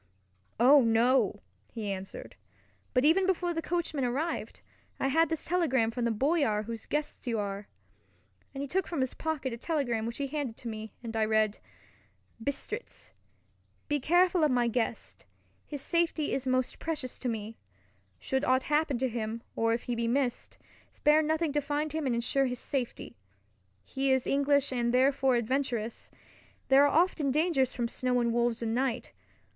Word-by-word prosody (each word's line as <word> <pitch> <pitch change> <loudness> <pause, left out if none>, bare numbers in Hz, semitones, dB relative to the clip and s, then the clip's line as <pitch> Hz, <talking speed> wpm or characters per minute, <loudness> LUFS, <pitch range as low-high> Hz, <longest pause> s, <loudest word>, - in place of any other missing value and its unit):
"Oh, 270 +4 +7
no!" 235 +3 +3 0.3
he 215 -3 -4
answered, 190 -11 -7 0.6
"but 250 +2 +2
even 370 +5 +4
before 355 -2 +1
the 325 - -2
coachman 330 -5 -1
arrived, 275 +7 -2 0.4
I 270 - +1
had 325 +3 +3
this 325 - -3
telegram 275 -10 +1
from 240 0 -2
the 235 - +2
Boyar 260 -3 +1
whose 225 0 -7
guest 295 -3 -3
you 230 -2 0
are," 200 -1 -4 0.8
and 275 0 -5
he - - -4
took 375 +7 -1
from 330 -6 -2
his 260 - -1
pocket 305 -6 -3
a - - -5
telegram 240 -6 -1
which 235 - -5
he 280 - -1
handed 275 -5 -4
to 240 - -8
me, 220 -1 -6
and 225 -1 -6
I 220 - +2
read: 215 -1 +1 0.8
Bistritz. 420 - -5 0.7
Be 295 -1 0
careful 350 +4 +3
of 305 - +4
my 245 -2 +2
guest—his 240 +4 -5
safety 335 -3 0
is 265 -1 -2
most 255 0 0
precious 300 -6 -4
to 255 - -2
me. 225 0 -5 0.6
Should 265 +1 -1
aught 260 -1 +3
happen 300 -2 +1
to 260 +2 0
him, 230 -1 -4
or 225 0 +1
if 230 +1 -1
he 245 - -3
be 235 0 -1
missed, 250 0 -1 0.3
spare 300 +1 +4
nothing 315 0 0
to 295 - +1
find 295 +1 -2
him 315 -3 -1
and 245 - +1
ensure 260 +3 +1
his 250 0 -3
safety. 260 - -4 0.7
He 270 0 0
is 260 -1 +2
English 280 0 +2
and 240 -2 0
therefore 265 0 +3
adventurous. 235 -2 -1 0.6
There 275 +2 +7
are 310 +3 +5
often 315 -6 -2
dangers 280 -3 +1
from 240 -2 -1
snow 250 +1 0
and 235 -1 +1
wolves 235 -1 +1
and 225 -1 -1
night. 255 0 -1
260 Hz, 170 wpm, -30 LUFS, 235-295 Hz, 0.8 s, Oh